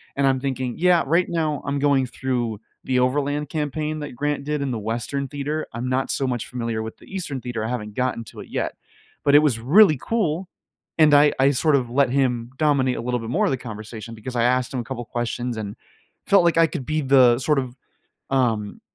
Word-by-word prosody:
and 140 - +1
I'm 135 -1 +2
thinking, 130 -2 -3
"Yeah, 180 -1 +4
right 170 +5 +2
now 155 -4 -1
I'm 140 0 -1
going 140 -2 +3
through 120 -4 -2 0.3
the 130 -1 +1
Overland 145 +3 0
Campaign 155 0 -2
that 150 -4 -7
Grant 145 +1 -2
did 150 0 -1
in 140 -2 -1
the 115 - -3
Western 120 +6 -3
Theater, 145 +3 -3
I'm 120 +2 -3
not 130 +1 0
so 135 - -1
much 120 -3 -2
familiar 115 -3 -3
with 110 0 -6
the - - -18
Eastern 150 -9 -4
Theater, 120 -3 -4
I - - -3
haven't 105 -4 -4
gotten 125 -2 -1
to - - -12
it - - -12
yet." - - -2 0.5
But 140 0 +5
it - - +10
was 145 -7 +1
really 155 - +6
cool, 185 -6 -1 0.5
and 155 -2 +6
I 145 0 +6
I 135 +1 +5
sort 145 +2 +2
of 125 -3 0
let 135 +2 +2
him 125 -3 0
dominate 140 -4 +2
a - - -3
little 125 +1 -1
bit 115 -1 -6
more 125 - +1
of - - +1
the 135 - 0
conversation, 110 -1 -8
because 120 +4 -7
I 115 - +2
asked 125 +2 +1
him 130 - -1
a - - -9
couple 120 -1 -5
questions 120 +1 -3
and 105 -2 -5 0.5
felt 195 -3 +5
like 170 -1 +3
I 165 0 +6
could 150 -5 -5
be 155 +2 -1
the, 130 -3 +5
sort 150 +2 +2
of, 125 -2 -5 0.5
um, 115 -6 0
130 Hz, 225 wpm, -23 LUFS, 120-150 Hz, 0.5 s, it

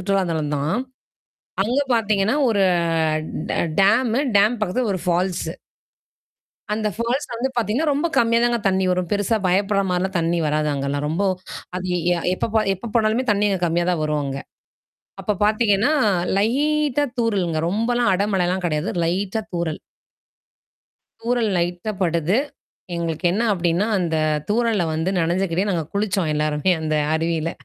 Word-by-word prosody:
சுற்றுலா 195 0 +1
தலந்தான். 150 +1 -1 0.9
அங்க 245 +6 +1
பாத்தீங்கன்னா, 215 +1 +1
ஒரு 205 -4 +2 0.9
ட - - -1 0.3
டேம். 220 +4 +3 0.3
டேம் 215 +4 +3
பக்கத்தில 215 +4 0
ஒரு 185 - -4
ஃபால்ஸ். 180 +1 0 1.3
அந்த 215 0 0
ஃபால்ஸ்ல 240 +3 -2
வந்து 260 +3 0
பாத்தீங்கன்னா, 240 +7 +1
ரொம்ப 290 +4 0
கம்மியா 230 0 +3
தாங்க 240 0 +2
தண்ணி 190 0 +1
வரும். 180 -1 0
பெருசா 205 +2 +1
பயப்படுற 200 +2 +2
மாரிலாம் 185 +2 -1
தண்ணி 170 +1 0
வராது, 150 0 0
அங்கலாம். 140 +1 -2
ரொம்ப, 165 +6 0 0.5
அது 185 0 -4 0.3
எ - - -1 0.2
எப்போ - - -2
போ 220 - +5
எப்போ 190 +5 -9
போனாலுமே 225 +3 +2
தண்ணி 210 0 +2
அங்க 190 -2 -1
கம்மியா 170 +1 0
தான் 175 -3 0
வரும், 150 -1 0
அங்க. 135 0 -4 0.8
அப்ப 210 -2 -1
பாத்தீங்கன்னா, 215 +3 +2 0.5
லைட்டா 290 +6 +1 0.2
தூறலுங்க. 195 -8 0
ரொம்பலாம் 230 +2 +1
அடமழிலாம் 185 -2 0
கிடையாது. 155 +2 -1
லைட்டா 190 +6 -1
தூறல். 170 -3 -2 1.4
தூறல் 235 -2 +1
லைட்டா 175 +4 -1
படுது. 170 +5 +1 0.6
எங்களுக்கு 170 0 -2
என்ன 210 +5 0
அப்படின்னா, 175 +2 +1
அந்த 170 -3 -1 0.3
தூறல்ல 220 -3 +1
வந்து 160 +4 -1
நனைஞ்சுகிட்டே, 180 +3 0
நாங்க 170 -4 -1
குளிச்சோம் 195 -5 0
எல்லாருமே, 150 +3 0
அந்த 155 -1 -1 0.2
அருவியில. 165 0 -1
195 Hz, 135 wpm, -22 LUFS, 170-220 Hz, 1.4 s, போ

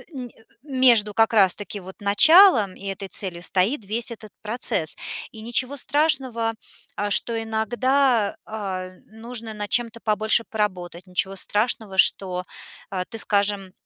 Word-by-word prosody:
а, - - -15
ни 250 -3 -8
а, - - -23 0.2
между 250 -7 +3
как 225 +1 +2
раз 195 -5 +4
таки 205 0 -8
вот 190 +1 -12
началом 220 - +5
и - - -14
этой 195 0 -5
целью 180 -3 -4
стоит 200 +7 0
весь 230 +4 -1
этот 215 -2 -11
процесс. 210 -7 +1 0.4
И 220 - -11
ничего 255 +4 -1
страшного, 260 -5 0 0.4
а, 205 0 -3
что 235 - +2
иногда, 240 +1 0
а, 190 -4 -5 0.2
нужно 225 0 -8
над 210 -1 -5
чем-то 235 -1 -1
побольше 220 +1 +1
поработать, 185 -4 -4
ничего 190 +2 -1
страшного, 210 0 -1
что 185 -2 +3 0.6
ты, 225 - -8
скажем, 200 -3 0
220 Hz, 145 wpm, -22 LUFS, 195-235 Hz, 0.6 s, началом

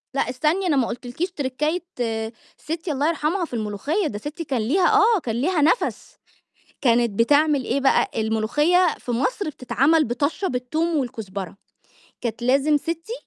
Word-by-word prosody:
لأ 275 - 0
استني 310 +9 0
أنا 310 - +2
ما 255 -4 +2
قلتلكِيش 250 +9 -4
تركاية 300 +3 -2 0.7
ستّي 325 +1 -4
الله 285 +1 0
يرحمها 335 +3 0
في 315 - -15
الملوخية، 235 - -1
ده 205 - -5
ستي 295 +8 -6
كان 265 -6 -1
ليها 345 - +2
آه، 430 0 +4
كان 225 -2 -2
ليها 310 +7 +1
نَفَس، 325 +11 0 0.6
كانت 240 -2 +3
بتعمل 285 +6 +3
إيه 280 - 0
بقى؟ 270 - +3
الملوخية 230 +12 +2
في - - -7
مصر 335 - -1
بتتعمل 280 +4 +2
بطشّة 285 - -1
بالتوم 310 +7 -1
والكُزبرة، 200 - -4 0.6
كانت 235 -1 -4
لازم 275 +4 +3
ستي 330 +7 -4
285 Hz, 150 wpm, -23 LUFS, 240-330 Hz, 0.7 s, آه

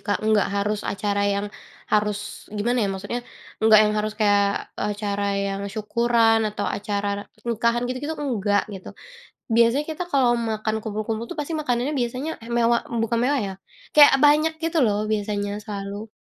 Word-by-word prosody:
Kak 205 +1 -2
nggak 215 -2 +3
harus 205 +1 0
acara 200 0 -1
yang 200 0 -1 0.5
harus 210 0 -1
gimana 240 +4 0
ya 205 - +1
maksudnya 200 +5 -4 0.4
nggak 220 -1 +7
yang 210 - +1
harus 215 0 -1
kayak 205 -2 +1 0.2
acara 205 -1 -2
yang 200 0 -2
syukuran 225 +1 +2
atau 210 - -4
acara 205 0 -2 0.2
nikahan 235 +1 0
gitu-gitu 265 +6 -3
enggak 205 -6 +1
gitu, 190 -2 -8 0.7
biasanya 235 +5 +4
kita 315 +3 -4
kalau 260 -3 +4
makan 220 -1 -2
kumpul-kumpul 220 +1 -3
itu - - -7
pasti 295 +3 -4
makanannya 255 0 -1
biasanya 255 +5 -2 0.3
mewah 235 0 +3 0.2
bukan 230 +1 0
mewah 280 +1 +2
ya 195 - -5 0.4
kayak 295 -2 +8
banyak 305 +2 +5
gitu 330 0 0
loh 205 -1 +1
biasanya 205 -1 -1
selalu, 205 0 -6
215 Hz, 150 wpm, -23 LUFS, 205-240 Hz, 0.7 s, kayak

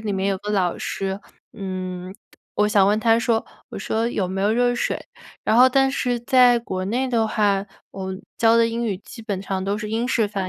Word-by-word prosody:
里 215 -1 -3
面 195 0 -1
有 195 -1 0
个 205 +2 -8
老 185 -4 0
师， 195 +1 -3 0.3
嗯， 185 -2 -5 0.4
我 210 - +3
想 205 -2 +4
问 210 +1 +2
他 225 +1 +3
说， 230 -1 +1 0.2
我 - - -7
说： 225 +1 -1
“有 200 -6 -1
没 190 +1 -3
有 205 - +2
热 245 +2 +2
水”。 240 - -2 0.4
然 220 - +2
后 250 +2 +7
但 270 +1 +3
是 245 -3 0
在 245 0 +5
国 190 -5 -4
内 250 +6 0
的 225 -3 +1
话， 205 -2 +1 0.2
我 190 -1 -5 0.3
教 230 0 +5
的 230 - +5
英 230 +1 -2
语 205 -4 -1
基 225 - -12
本 200 -4 -4
上 190 -1 -3
都 200 +2 -1
是 215 0 -5
英 230 +2 -1
式 225 -4 +2
发 195 -2 -3
215 Hz, 235 characters per minute, -22 LUFS, 195-235 Hz, 0.4 s, 后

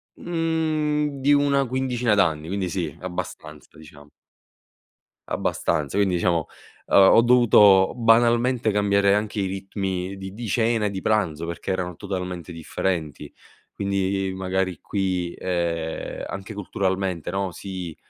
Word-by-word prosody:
mhmm, 155 -4 -1
di 145 +2 +4
una 140 -1 +3
quindicina 125 -3 0
d'anni, 80 -5 +1
quindi 95 0 -2
sì, 85 -5 -3
abbastanza, 90 -3 -7
diciamo 75 -2 -15 1.2
abbastanza, 75 +4 -1
quindi, 100 -3 +2
diciamo, 85 -2 +1 0.4
ehm, - - +2 0.2
ho 115 - +7
dovuto 105 -6 +6
banalmente 120 0 +3
cambiare 100 -1 +3
anche 105 0 -1
i 95 - 0
ritmi 95 -1 -4
di 95 0 -8
di 115 0 -6
cena 115 0 +1
e 100 - -1
di 95 - -5
pranzo 85 -7 0
perché 85 +3 -5
erano 90 -1 -2
totalmente 90 -4 -5
differenti. 80 -2 -3 0.4
Quindi, 95 -1 -1
magari 95 -2 -2
qui, 90 -3 -2
ehm, 85 -3 -3
anche 95 +2 -7
culturalmente, 95 -3 -2
no, 95 -1 -2
si, 90 -5 -7
95 Hz, 125 wpm, -23 LUFS, 90-115 Hz, 1.2 s, ho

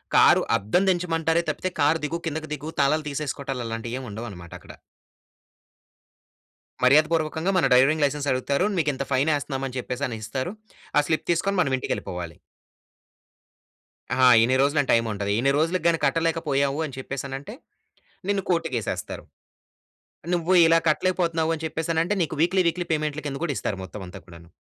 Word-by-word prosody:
Car - - +6 0.2
అద్దం 110 - +1
దీంచమంటారే 165 -2 +1
తప్పితే, 185 +4 -2
"car 150 +3 +3
దిగు. 165 +3 -2
కిందకు 155 0 -3
దిగు, 150 +1 -6
తాళాలు 150 +3 +2
తీసేసుకోవటాలు" 140 -3 -4
అలాంటివేమి 115 +3 -5
ఉండవన్నమాటక్కడ... 100 -6 -9 2.1
మర్యాద 145 +5 +6
పూర్వకంగా 160 +2 0
మన 185 - +3
డ్రైవింగ్ 140 +5 +4
లైసెన్స్ 145 0 -2
అడుగుతారు. 140 +6 0
"మీకింత 145 -4 0
ఫైన్ 140 +4 +2
వేస్తున్నాం" 140 -2 -3
అని 130 0 -7
చెప్పేసని 125 -1 -3
ఇస్తారు. 130 +9 -3 0.5
ఆ - - +8
స్లిప్ 160 - -1
తీసుకొని 195 +4 0
మన 135 -6 0
ఇంటికెళ్ళిపోవాలి. 90 -8 -5 1.8
ఆా! 130 - +4 0.2
ఇన్ని 125 +3 +3
రోజులని 145 0 +1
టైమ్ 115 0 +3
ఉంటది. 100 0 -2
ఇన్ని 135 +3 +2
రోజులకి 165 +4 0
గాని 165 -1 +2
కట్టలేకపోయావు 150 -2 0
అని 140 -4 -8
చెప్పేసనంటే, 135 +5 -6 0.8
నిన్ను 200 -1 +1
కోర్టుకేసేస్తారు. 160 - -2 1.1
నువ్వు 175 +1 0
ఇలా 165 0 +5
కట్టలేకపోతున్నావు 165 -1 +1
అని 160 0 -7
చెప్పేసనంటే 165 +4 -1
నీకు 160 - -2
వీక్లీ 185 +2 +3
వీక్లీ 175 +1 -2
పేమెంట్‌ల 155 -1 -1
కింద 140 -1 -3
కూడా 150 -5 -1
ఇస్తారు 100 - -3
మొత్తం 95 +2 -9
అంతా 90 +2 -10
కూడాను. 85 -1 -14
145 Hz, 140 wpm, -24 LUFS, 130-165 Hz, 2.1 s, ఆ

